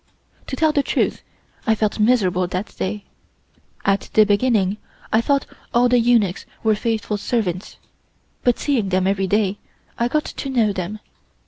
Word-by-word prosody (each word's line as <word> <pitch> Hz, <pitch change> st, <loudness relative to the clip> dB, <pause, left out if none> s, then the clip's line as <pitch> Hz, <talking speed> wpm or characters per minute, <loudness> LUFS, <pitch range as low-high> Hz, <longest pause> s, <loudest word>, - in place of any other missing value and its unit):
To -, -, -3 dB
tell 315 Hz, +2 st, +3 dB
the 290 Hz, -, +2 dB
truth, -, -, 0 dB, 0.5 s
I 220 Hz, -, +4 dB
felt 215 Hz, 0 st, -1 dB
miserable 195 Hz, -6 st, +3 dB
that 185 Hz, +3 st, -4 dB
day. 100 Hz, +2 st, -3 dB, 0.8 s
At 195 Hz, 0 st, +1 dB
the 215 Hz, -, +7 dB
beginning 205 Hz, -2 st, +2 dB, 0.4 s
I 220 Hz, -, +5 dB
thought 280 Hz, +3 st, +1 dB, 0.3 s
all 245 Hz, +1 st, +5 dB
the 245 Hz, 0 st, +4 dB
eunuchs 230 Hz, -6 st, +2 dB, 0.2 s
were 220 Hz, -1 st, +4 dB
faithful 220 Hz, -1 st, -1 dB
servants, 200 Hz, -5 st, -2 dB, 0.7 s
but 245 Hz, -2 st, +3 dB
seeing 245 Hz, -9 st, 0 dB
them 185 Hz, 0 st, +1 dB
every 195 Hz, 0 st, +1 dB
day, 205 Hz, 0 st, +1 dB, 0.4 s
I 235 Hz, -, +2 dB
got 300 Hz, +4 st, 0 dB
to 275 Hz, -, -5 dB
know 230 Hz, -6 st, +2 dB
them. 195 Hz, +3 st, -5 dB
215 Hz, 155 wpm, -21 LUFS, 195-245 Hz, 0.8 s, the